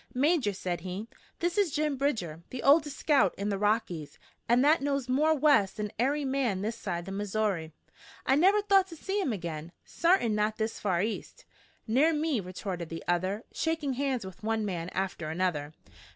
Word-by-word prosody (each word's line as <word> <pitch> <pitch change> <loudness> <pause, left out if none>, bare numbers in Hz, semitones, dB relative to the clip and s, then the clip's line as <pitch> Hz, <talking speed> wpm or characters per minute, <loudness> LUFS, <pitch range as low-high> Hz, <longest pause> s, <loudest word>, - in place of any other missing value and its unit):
"Major," 280 -4 +2
said 180 -3 -4
he, 190 +5 -5 0.3
"this 345 +3 +1
is 400 -4 +3
Jim 300 0 0
Bridger, 215 - -1
the 255 - -6
oldest 295 0 +4
scout 270 - +3
in 200 +1 -2
the 200 - 0
Rockies, 205 -7 -1 0.3
an' 240 +1 +5
that 305 +2 +4
knows 275 -2 -1
more 300 +5 +3
West 275 -10 +3
than 210 -1 -3
ary 280 +4 +1
man 260 -8 0
this 225 +2 -2
side 175 -6 -4
the 195 - -6
Missoury. 200 -4 -1 0.5
I 265 - +3
never 390 +7 +4
thought 390 -2 +4
to 340 - -10
see 390 +5 -2
him 335 - 0
agin, 170 -5 -5
sartain 335 - +2
not 210 +1 0
this 220 0 -2
far 185 -3 +1
east." 220 +1 -5 0.4
"Ner 275 +9 +3
me," 300 -4 0
retorted 180 -2 -5
the 165 - -6
other, 185 +5 0
shaking 320 -4 -1
hands 260 -4 -1
with 190 -1 -10
one 220 0 -1
man 175 -3 -3
after 185 -5 -3
another. 160 -3 -1
220 Hz, 180 wpm, -29 LUFS, 185-290 Hz, 0.5 s, an